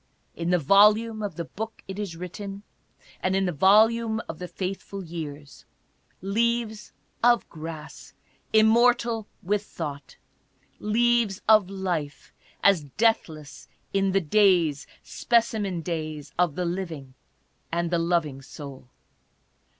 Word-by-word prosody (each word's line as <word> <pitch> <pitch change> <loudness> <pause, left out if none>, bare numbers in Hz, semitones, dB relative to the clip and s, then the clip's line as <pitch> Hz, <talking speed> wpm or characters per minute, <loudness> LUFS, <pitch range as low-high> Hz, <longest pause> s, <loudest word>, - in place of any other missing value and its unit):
In 170 0 -3
the 180 - +4
volume 210 +7 +4
of 205 -5 -4
the 170 - -4
Book 220 +6 -7
it 190 +1 -6
is 195 -5 -4
written, 195 +3 -7 0.6
and 185 0 +1
in 195 0 +2
the 180 - 0
volume 220 +7 +4
of 165 - -7
the 180 - -5
faithful 195 +1 -5
years: 150 -4 -8 0.6
Leaves 225 +1 -1 0.3
of 240 0 +4
Grass 160 -1 -9 0.4
immortal 230 0 +3 0.2
with 205 +3 0
thought; 145 -8 -7 0.6
Leaves 230 -2 +1
of 215 -4 +5
Life 175 -7 -4 0.3
as 185 -7 +4
deathless 160 -10 0 0.3
in 195 -1 +2
the 195 +1 +2
days, 170 -5 +3 0.2
Specimen 220 -6 0
Days 155 -4 -4
of 175 -4 +1
the 180 - -2
living 165 -7 -5 0.6
and 170 0 -1
the 170 - +2
loving 165 -5 0
soul. 135 -2 -10
190 Hz, 120 wpm, -26 LUFS, 160-215 Hz, 0.6 s, of